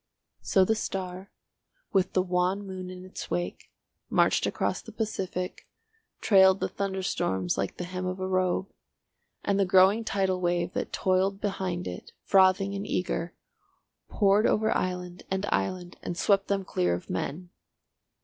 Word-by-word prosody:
So 190 -2 +3
the 220 - +2
star, 190 -3 -4 0.6
with 190 -2 +2
the 185 - +3
wan 185 +2 0
moon 185 -1 -6
in 185 0 -9
its 185 - -8
wake, 175 0 -3 0.4
marched - - +3
across - - -1
the - - -11
Pacific, 190 -4 -4 0.5
trailed 190 -2 +6
the - - 0
thunderstorms 185 - -1
like 100 - -3
the - - -4
hem 185 +1 -4
of 185 +1 -3
a 185 - -2
robe, 185 0 +1 0.8
and 200 -1 +1
the - - +5
growing 190 +4 +5
tidal 190 -3 0
wave 175 0 0
that - - -3
toiled 190 +1 +1
behind 190 -3 -2
it, - - -8
frothing 190 +1 +4
and 200 +1 -4
eager, 175 -1 -2 0.7
poured 205 +1 +3
over 220 +1 +2
island 180 -1 -3
and 190 +1 -1
island 175 - -2
and 175 - -5
swept 195 0 +2
them 195 -1 -1
clear 90 - +1
of 90 - -8
men. 170 - -4
185 Hz, 150 wpm, -28 LUFS, 180-195 Hz, 0.8 s, trailed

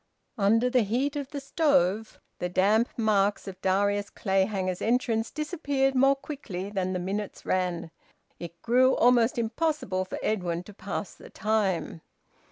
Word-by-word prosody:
Under 225 +5 +3
the 250 0 +3
heat 250 +8 0
of 285 -2 -4
the 290 - -5
stove, 225 - +1 0.2
the 180 - -2
damp 210 +6 +3
marks 210 -3 +1
of 190 -1 -8
Darius 200 +2 +1
Clayhanger's 190 -2 -1
entrance 230 -1 +1
disappeared 285 -4 -1
more 270 +1 +4
quickly 215 -10 -6
than 185 -2 -1
the - - -1
minutes 195 +3 -4
ran. 175 -3 -1 0.5
It 170 0 -8
grew 255 +2 +4
almost 245 0 +4
impossible 230 - -1
for - - -6
Edwin 180 -5 -1
to 210 - -13
pass 200 +1 -5
the - - -14
time. 200 -6 -1
210 Hz, 145 wpm, -27 LUFS, 190-250 Hz, 0.5 s, more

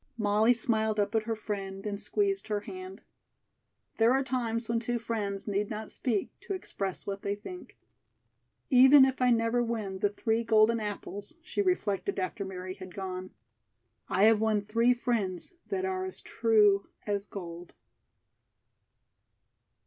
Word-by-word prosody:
Molly 215 +1 +3
smiled 220 -2 0
up 205 +1 +1
at 220 -1 +1
her 225 0 -1
friend 195 -2 -5
and 205 -1 -3
squeezed 395 - -1
her 210 -1 -1
hand. 370 - -8 1.0
There 225 +2 +5
are 270 +1 +2
times 235 -3 -2
when 230 -1 +1
two 240 +1 -2
friends 210 -4 -3
need 205 0 0
not 215 0 -5
speak 225 -7 -1
to 395 - -4
express 195 - -5
what 200 0 -4
they 200 0 -1
think. 360 - -10 0.9
"Even 265 +2 +8
if 265 -1 -2
I 250 - +5
never 230 0 +2
win 220 -5 -3
the 205 - +2
three 225 +2 0
golden 225 0 +4
apples," 205 - -6
she 375 +3 -1
reflected 210 - 0
after 190 +1 -2
Mary 185 -1 -6
had 185 -2 -11
gone, 185 -1 -5 0.8
"I 195 - +2
have 220 0 +6
won 220 -2 +2
three 230 +4 +2
friends 220 - -2
that 380 -2 -1
are 375 0 -2
as 375 0 -6
true 210 -3 +3 0.2
as 205 -1 -2
gold." 175 -2 -8
220 Hz, 150 wpm, -30 LUFS, 200-240 Hz, 1.0 s, Even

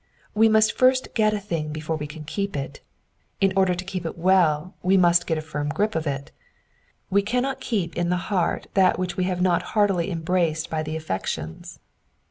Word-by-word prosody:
We 220 +1 +5
must 220 0 +4
first 255 0 +3
get 215 -2 +3
a 210 - -1
thing 165 -6 -3
before 155 +1 -3
we 150 -1 -5
can 155 +1 -9
keep 200 +3 -3
it. 135 - -5 0.6
In 195 -1 +3
order 190 -2 +3
to 185 +1 -6
keep 185 -2 -4
it 165 - -5
well 175 -2 +2
we 190 +2 +3
must 175 -1 +4
get 160 - 0
a 155 - -4
firm 150 -2 -3
grip 210 +7 0
of 160 -4 -2
it: 140 -1 -4 0.8
we 200 +1 +4
cannot 250 +6 -1
keep 190 -8 -2
in 175 0 0
the 180 - +1 0.2
heart 180 -3 0
that 190 -2 +4
which 180 -1 -3
we 185 - 0
have 180 -1 -1
not 175 -2 +3 0.2
heartily 195 -4 +2
embraced 165 -2 -1
by 160 -1 -1
the 155 0 -4
affections. 95 - -5
180 Hz, 200 wpm, -24 LUFS, 160-195 Hz, 0.8 s, We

